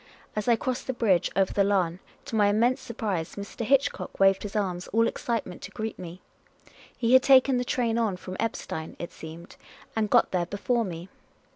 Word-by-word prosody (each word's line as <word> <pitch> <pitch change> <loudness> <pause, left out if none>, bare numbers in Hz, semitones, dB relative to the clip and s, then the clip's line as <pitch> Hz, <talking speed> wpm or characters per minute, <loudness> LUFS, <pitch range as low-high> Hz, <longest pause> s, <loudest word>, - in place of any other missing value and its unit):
As 215 +1 -2
I 240 - +5
crossed 250 +3 -3
the 260 - -1
bridge 205 -8 +2
over 195 0 +2
the 200 - +3
Lahn, 185 -3 +1 0.3
to - - -5
my 210 -2 +4
immense 240 +6 +2
surprise, 210 -9 -3
Mr. 200 +3 -6
Hitchcock 275 +4 0
waved 195 0 +5
his 205 0 -7
arms, 180 -4 -1
all 230 +2 +2
excitement, 225 -7 -3
to - - -7
greet 220 0 -5
me. 180 0 -8 0.8
He 240 0 +1
had 260 - +8
taken 265 -1 +5
the - - 0
train 235 -2 0
on 210 -5 0
from 185 0 -8
Eppstein, 160 -7 -4
it 170 - -6
seemed, 160 +2 -11 0.4
and 220 -2 0
got - - +4
there 175 -2 0
before 230 +5 0
me. 175 -3 -6
210 Hz, 190 wpm, -27 LUFS, 185-235 Hz, 0.8 s, had